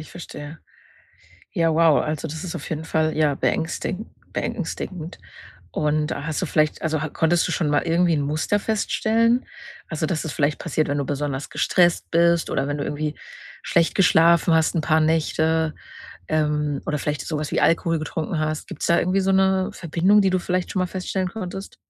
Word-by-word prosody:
ich 155 - -11
verstehe. 155 -3 -9 0.9
Ja, 165 -4 +2
wow, 165 -2 +4
also, 155 +1 -3
das 160 +4 -6
ist 175 - -5
auf - - -6
jeden 160 0 -4
Fall, 155 -1 0
ja, 150 -2 +2
beängstigen 185 +8 -2 0.2
beängstigend. 175 -3 -4 0.5
Und 150 0 0
hast 150 +2 -3
du - - 0
vielleicht 155 -1 +1
also, 155 -1 0
ha 160 - -2
konntest 165 +3 +1
du - - -2
schon 155 - 0
mal 145 0 +2
irgendwie 170 0 +3
'n 145 - 0
Muster 155 +8 0
feststellen? 225 +3 +1 0.4
Also, 155 -1 -2
dass 160 -2 -1
das 160 - -4
vielleicht 145 +1 0
passiert, 155 -2 -1
wenn 145 0 0
du 140 - -1
besonders 145 0 -3
gestresst 175 -2 +2
bist 170 -1 +3
oder 135 0 0
wenn 145 0 -2
du - - -2
irgendwie 150 0 -3 0.5
schlecht 170 -1 +2
geschlafen 170 -2 +4
hast, 160 +2 +2
'n 165 - +1
paar 155 +1 +2
Nächte, 160 0 +1 0.5
ähm, 150 -2 0
oder 150 -1 -1
vielleicht 150 0 -3
so 155 - -2
was 150 - -4
wie - - +1
Alkohol 165 0 +2
getrunken 160 0 -3
hast? 155 0 -2
Gibt's 180 - -5
da 170 - +4
irgendwie 185 +3 +1
so 195 +1 +1
'ne 190 0 +3
Verbindung, 185 +5 +3
die 195 - +3
du 185 - +2
vielleicht 180 0 -2
schon 190 - -1
mal 185 - +1
feststellen 185 0 -3
konntest? 195 -2 -7
160 Hz, 190 wpm, -23 LUFS, 150-180 Hz, 0.9 s, wow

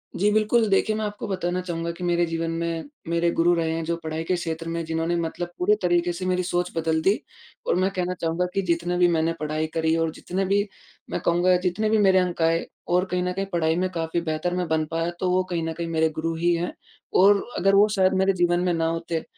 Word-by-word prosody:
जी। 205 +3 +2
बिल्कुल, 215 +2 +3
देखिए 215 +2 +2
मैं 215 - -2
आपको 205 0 -5
बताना 185 -1 -2
चाहूँगा 170 -2 -3
कि 170 +2 -9
मेरे 175 0 +2
जीवन 165 0 -2
में 165 - -3 0.2
मेरे 170 0 +2
गुरु 175 +1 +4
रहे 165 -1 0
हैं, 165 - -2
जो 170 +1 -1
पढ़ाई 160 0 -3
के 180 +2 0
क्षेत्र 165 -1 -4
में 170 0 -2
जिन्होंने 165 +1 -1
मतलब 175 +1 -4
पूरे 205 +4 +4
तरीके 175 0 +2
से 185 +2 -5
मेरी 185 0 +1
सोच 175 0 -1
बदल 160 0 +1
दी। 195 +6 +2 0.5
और - - +2
मैं 185 +2 +2
कहना 180 -1 -2
चाहूँगा 165 +2 0
कि 195 - +1
जितने 175 0 -1
भी 180 0 +5
मैंने 165 -1 +1
पढ़ाई 155 +1 -2
करी 160 0 +1
और 165 -1 0
जितने 190 +3 -3
भी 200 +2 +2 0.5
मैं - - -2
कहूँगा 175 +2 +4
जितने 185 +4 -1
भी 220 - +3
मेरे 190 -2 +5
अंक 180 -2 -1
आए 165 +1 +2 0.3
और 180 +1 +3
कहीं 180 0 0
न 180 0 -1
कहीं 195 +1 -2
पढ़ाई 160 -1 +2
में 185 +2 0
काफ़ी 165 0 -2
बेहतर 160 +2 -2
मैं 180 -1 -1
बन 160 -1 +1
पाया, 165 +1 0
तो 185 - 0
वो 185 0 +2
कहीं 170 -2 -1
न - - -3
कहीं 170 0 -4
मेरे 160 -1 +1
गुरु 165 +1 -1
ही 175 +1 +2
हैं। 170 +1 -3 0.4
और 200 +2 +5
अगर 195 +2 +3
वो 205 +2 +6
शायद 190 0 +3
मेरे 195 0 +3
जीवन 175 -1 +2
में 180 -1 +1
ना 165 0 0
होते, 165 0 -2
175 Hz, 240 wpm, -24 LUFS, 165-185 Hz, 0.5 s, वो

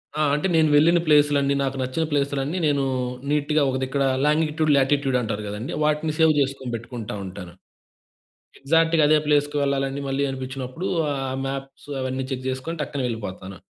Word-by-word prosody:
ఆ! - - -3 0.2
అంటే 150 +5 0
నేను 160 -1 +4
వెళ్ళిన 170 +4 +5
ప్లేస్‌లన్నీ, 145 -2 +4
నాకు 135 0 -2
నచ్చిన 130 +5 -1
ప్లేస్‌లన్నీ 140 +2 -1
నేనూ 140 -2 +2 0.5
నీట్‌గా 150 +1 +1
ఒక 130 - -1
దిక్కడా 135 +1 0 0.2
లాంగిట్యూడ్, 155 0 +2
లాటిట్యూడ్ 135 -1 +2
అంటారు 105 -2 -3
గదండీ! 105 +5 -5
వాటిని 150 +1 +1
సేవ్ 160 -1 +5
చేసుకొని 135 -2 -2
పెట్టుకుంటా 115 -2 -6
ఉంటాను. 90 -2 -9 1.1
ఎగ్జాక్ట్‌గా 165 +2 +3
అదే 155 +1 +5
ప్లేస్‌కు 145 0 +2
వెళ్ళాలని 140 0 -1
మళ్ళీ 135 +1 0
అనిపిచ్చినప్పుడూ 130 +5 -5 0.2
ఆహ్, 135 -2 -3
మాప్స్ 135 +1 -6
అవన్నీ 130 0 -2
చెక్ 130 0 -4
జేసుకొని 130 +6 -4
టక్కన 145 -1 -3
వెళ్ళిపోతాను. 100 -4 -6
140 Hz, 150 wpm, -23 LUFS, 130-150 Hz, 1.1 s, వెళ్ళిన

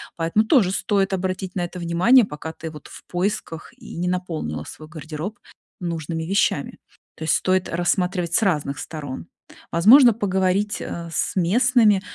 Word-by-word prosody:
поэтому 165 +6 +1
тоже 220 - +4
стоит 195 0 0
обратить 185 0 -3
на 185 - -1
это 175 - -9
внимание, 180 +10 +4
пока 150 -1 -7
ты 160 - -7
вот 150 -2 -12
в - - -13
поисках 175 -2 -3
и 235 -3 -11
не 175 +1 -1
наполнила 165 - -3
свой 155 - -11
гардероб 155 +5 -7 0.4
нужными 165 -2 -4
вещами. 195 +5 0 0.4
То 160 - -7
есть 160 - +3
стоит 185 0 +1
рассматривать 175 0 0
с - - +3
разных 150 -9 0
сторон. 145 - -7 0.4
Возможно 235 +9 +7
поговорить, 195 -1 0
а, 170 -1 -6
с - - -1
местными, 210 +2 +3
180 Hz, 155 wpm, -22 LUFS, 165-200 Hz, 0.4 s, Возможно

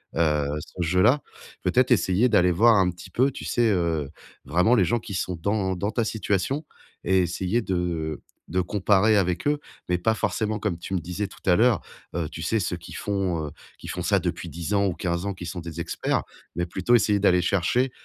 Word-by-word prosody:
heu, 75 -3 +2 0.2
ce 90 - -8
jeu-là. 90 - +3 0.4
Peut-être 130 +1 +2
essayer 100 +2 +3
d'aller 90 -5 +4
voir 115 +7 +5
un 95 -3 +4
petit 85 -1 -12
peu, 130 +3 +2
tu - - -8
sais, 120 -1 +2
heu, 85 -6 0 0.4
vraiment 90 - +3
les 95 -6 +4
gens 120 +7 +1
qui 105 - -8
sont 90 0 -2
dans 100 -1 0
dans 100 +3 -2
ta 120 - 0
situation 110 - -1 0.4
et 95 +1 +3
essayer 90 +6 -1
de 85 -5 -2 0.3
de 90 - 0
comparer 100 +3 +3
avec 90 +3 0
eux? 145 0 +2 0.3
Mais 90 - +2
pas 110 +6 +1
forcément 110 -1 -1
comme 100 -4 -2
tu 90 +3 -7
me 90 - +1
disais 90 +5 -4
tout - - -15
à 90 - +5
l'heure, 115 +2 +4 0.4
heu, 85 -3 -1
tu 80 - -8
sais 110 +6 +1
ceux 90 -2 -1
qui 85 - -12
font, 95 -6 -2
heu, - - -7 0.3
qui - - -10
font - - -4
ça - - +3
depuis - - -3
10 85 +4 -4
ans 100 0 +3
ou 95 - 0
15 85 +1 -2
ans, 100 - -2
qui 90 -1 -8
sont 90 +1 -5
des 85 0 -7
experts, 85 - -1 0.3
mais 85 +1 -1
plutôt 95 +7 0
essayer 105 -3 +3
d'aller 90 -3 +4
chercher 100 +9 +1
95 Hz, 215 wpm, -25 LUFS, 85-105 Hz, 0.4 s, voir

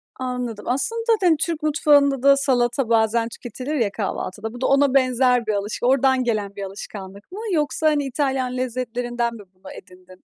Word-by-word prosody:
Anladım. 250 -4 -4
Aslında 365 - -1
zaten 370 -9 +3
Türk 325 0 -2
mutfağında 285 -3 +3
da 275 0 +6
salata 245 -2 +1
bazen 230 +1 +2
tüketilir 255 +6 -6
ya 230 -8 0
kahvaltıda, 210 +2 -4
bu 245 - -10
da - - +1
ona 275 -1 +3
benzer 255 -2 +3
bir 215 - +1
alış 205 +1 -3
oradan 265 0 +3
gelen 210 -4 -2
bir 200 - -6
alışkanlık 195 - -9
mı 400 - -7
yoksa, 310 0 0
hani, 295 -2 +2
İtalyan 265 -2 -1
lezzetlerinden 240 -1 -2
mi 210 - -11
bunu 190 +1 -12
edindin? 185 -1 -15
250 Hz, 170 wpm, -22 LUFS, 220-275 Hz, -, da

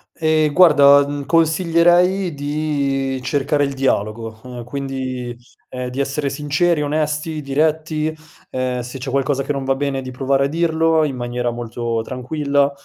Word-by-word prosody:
Ehm 155 -2 +1
guarda, 145 -5 +7
mhmm, 145 -1 -4
consiglierei 175 +2 +3
di 140 -2 -1
cercare 145 +1 0
il 140 -1 -1
dialogo 110 -3 -2 0.2
quindi, 130 -1 -5 0.3
ehm, 125 -1 -5
di 130 +2 -6
essere 140 +1 -1
sinceri, 150 +3 0
onesti, 150 +1 -2
diretti, 155 +2 0 0.4
ehm, 130 -1 -2
se 125 +2 -8
c'è 130 +1 -5
qualcosa 135 +1 0
che 140 - -3
non 140 - -3
va 135 - +2
bene 135 -1 -2
di 130 - -7
provare 135 +1 +1
a - - +1
dirlo, 160 0 +2
in 140 -4 -1
maniera 120 0 -2
molto 120 -1 -3
tranquilla, 140 +3 0
140 Hz, 145 wpm, -19 LUFS, 130-155 Hz, 0.4 s, guarda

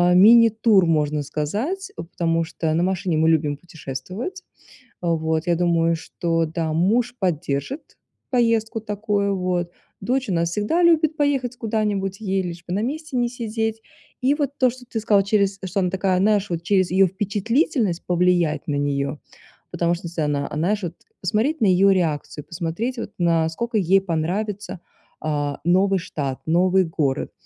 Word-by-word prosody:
мини-тур, 220 -1 +6
можно 150 -2 +1
сказать, 230 - -3
потому 165 -1 -1
что 160 -1 -2
на 170 - +1
машине 185 -3 0
мы 160 +1 +3
любим 150 -3 +1
путешествовать. 180 - -7 0.6
Вот, 160 -1 0
я 170 -1 +2
думаю, 170 -1 +2
что 165 0 -1
да, 160 0 -2
муж 225 +9 +1
поддержит 180 - -3 0.3
поездку 230 -3 +1
такую 205 -2 -1
вот. 180 -1 -1 0.3
Дочь 255 +5 -1
у - - 0
нас 170 0 +1
всегда 210 - 0
любит 320 -2 +4
поехать 275 -5 0
куда-нибудь, 210 -4 -2
ей 195 -2 0
лишь 170 -1 -7
бы 175 - -3
на 205 - 0
месте 300 +3 -4
не 240 -1 +2
сидеть. 225 -2 -3 0.4
И 265 +3 +3
вот 290 -3 -1
то, 255 - +4
что 250 +1 -12
ты 225 - -3
сказала, 205 -2 +3
через 200 -1 +1
что 190 +2 -1
она 180 - +1
такая, 190 0 +1
знаешь, 205 0 +2
вот 170 -1 -2
через 185 0 +2
ее 190 +2 +5
впечатлительность 205 - 0
повлиять 175 -3 +1
на 145 - 0
нее, 140 0 -1 0.5
потому 170 0 +1
что 170 0 -7
если 165 -1 -4
она, 145 -1 0
а, - - -7
знаешь, 200 +7 0 0.4
посмотреть 225 - 0
на - - +4
ее 195 +1 +5
реакцию, 155 -4 -2
посмотреть 175 +9 -3
вот 210 - -5
насколько 170 +7 0
ей 195 0 +4
понравится, 190 +4 -3 0.4
а, 145 -2 -2
новый 190 +2 +3
штат, 140 -5 -4
новый 180 +3 +3
город. 150 -5 -1
185 Hz, 155 wpm, -22 LUFS, 165-220 Hz, 0.6 s, мини-тур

